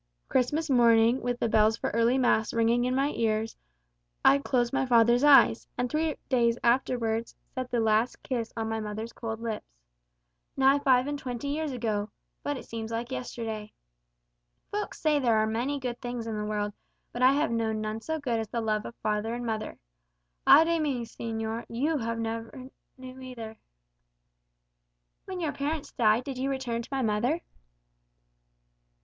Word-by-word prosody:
Christmas 295 +6 +1
morning, 235 -1 +4
with 245 0 -2
the - - +1
bells 220 0 +3
for - - -2
early 230 +3 +3
mass 235 -4 +2
ringing 230 +1 +3
in 255 +1 0
my 275 +2 +2
ears, 225 -3 -1 0.7
I 280 - +7
closed 250 -3 0
my 270 0 +2
father's 240 0 +4
eyes; 275 -5 +6
and 245 0 -1
three 310 0 0
days 235 -3 +2
afterwards, 235 -2 +1 0.2
set 255 -2 -4
the 240 - 0
last 220 +2 +1
kiss 235 -4 -3
on 225 0 -1
my 225 0 -2
mother's 215 +2 -5
cold 225 -1 -5
lips. 225 -2 -3 0.9
Nigh 270 +1 +5
upon 285 - -7
five 255 -2 +5
and 290 0 -3
twenty 255 +1 -4
years 305 +1 -2
ago, 220 -4 -2 0.3
but 290 -1 -2
it - - -9
seems 225 -1 -6
like 230 +2 -4
yesterday. 225 -4 -5 1.0
Folks 415 0 -4
say 305 -2 +2
there 235 -5 +3
are 215 - +3
many 245 +6 -1
good 245 -2 -4
things 245 -2 -4
in 225 -1 -3
the 210 0 -3
world, 205 -1 -2 0.4
but 240 - -5
I 255 +1 +6
have 295 0 +1
known 225 -1 0
none 215 +1 -3
so 320 +6 -2
good 245 -6 -1
as 220 - -3
the 235 - -3
love 215 -2 -1
of 235 - -10
father 215 +2 -1
and 240 0 -5
mother. 220 -2 -3 0.7
Ay - - +9
de 335 0 +1
mi, 270 -6 -1
señor, 225 0 -4
you 285 +8 0 0.2
never 230 +3 -5 0.3
knew 255 0 -10
either." 230 -4 -8 1.7
"When 375 -1 -5
your 315 -4 -1
parents 285 +2 -3
died, 220 +1 +3
did 265 -1 -6
you 270 +1 0
return 255 -4 -2
to 235 - -11
my 270 -1 0
mother?" 240 +9 +1
240 Hz, 175 wpm, -28 LUFS, 225-265 Hz, 1.7 s, Ay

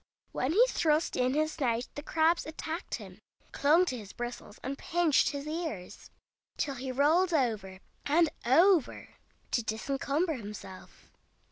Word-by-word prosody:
When 255 - -1
he 460 +7 +6
thrust 315 -8 +1
in 255 +1 +1
his 310 +1 +1
snout 240 -5 -1
the 290 - -6
crabs 320 +2 +1
attacked 320 +2 -5
him, - - -11 0.3
clung 315 +6 +4
to 260 - -2
his 205 -2 -11
bristles 240 -3 -7
and 270 +2 -3
pinched 330 0 +2
his 285 -1 -5
ears, 305 - -5 0.5
till 280 - -1
he 260 0 -5
rolled 320 +7 +3
over 210 -9 -1 0.3
and 325 +3 +4 0.2
over 330 +6 +3 0.4
to 240 - +2
disencumber 275 +9 -1
himself. 205 -6 -10
285 Hz, 140 wpm, -30 LUFS, 245-325 Hz, 0.5 s, he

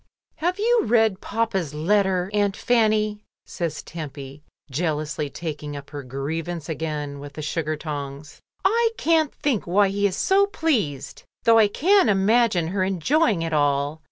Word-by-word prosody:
"Have 355 +3 -1
you 465 +2 +3
read 220 -4 +2
papa's 195 -9 -2
letter. 190 +2 +1
Aunt 205 -2 +1
Fanny?" 215 -3 +1 0.2
says 170 -4 -4
Tempy, 140 -3 -8 0.3
jealously 150 0 -2
taking 150 -2 -6
up 140 0 -11
her 145 -1 -5
grievance 150 +5 -4
again 150 -3 -4
with 145 0 -9
the 155 - -6
sugar 155 0 -2
tongs. 145 -1 -7 0.3
"I 460 +4 +3
can't 320 -2 +2
think 260 -11 -1
why 195 +3 +3
he 200 +1 +1
is 185 - -4
so 395 +1 +3
pleased, 240 - -1 0.2
though 230 0 +6
I 215 - +6
can 360 - +3
imagine 200 -3 +3
her 190 +1 0
enjoying 195 - +1
it 165 -1 -3
all. 145 +1 +1
180 Hz, 150 wpm, -23 LUFS, 150-225 Hz, 0.3 s, though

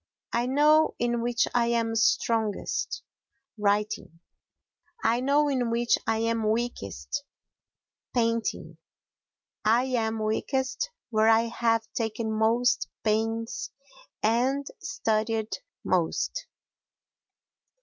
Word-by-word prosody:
I 240 +1 +1
know 300 +4 +4
in 240 0 0
which 240 0 +1
I 235 -1 +3
am 230 -1 +1
strongest—writing; 210 -2 -1 0.8
I 235 +1 +3
know 285 +3 +3
in 255 -4 0
which 235 +1 +2
I 225 - +2
am 225 -1 0
weakest—painting; 235 -1 -4 0.8
I 230 +3 +4
am 230 -4 0
weakest 265 - -1 0.2
where 220 0 +4
I 225 0 +6
have 230 -1 +1
taken 220 -1 -2
most 235 +4 +2
pains 225 -1 -1 0.5
and 255 +6 +2
studied 225 0 -1 0.2
most. - - 0
230 Hz, 90 wpm, -27 LUFS, 220-245 Hz, 0.8 s, I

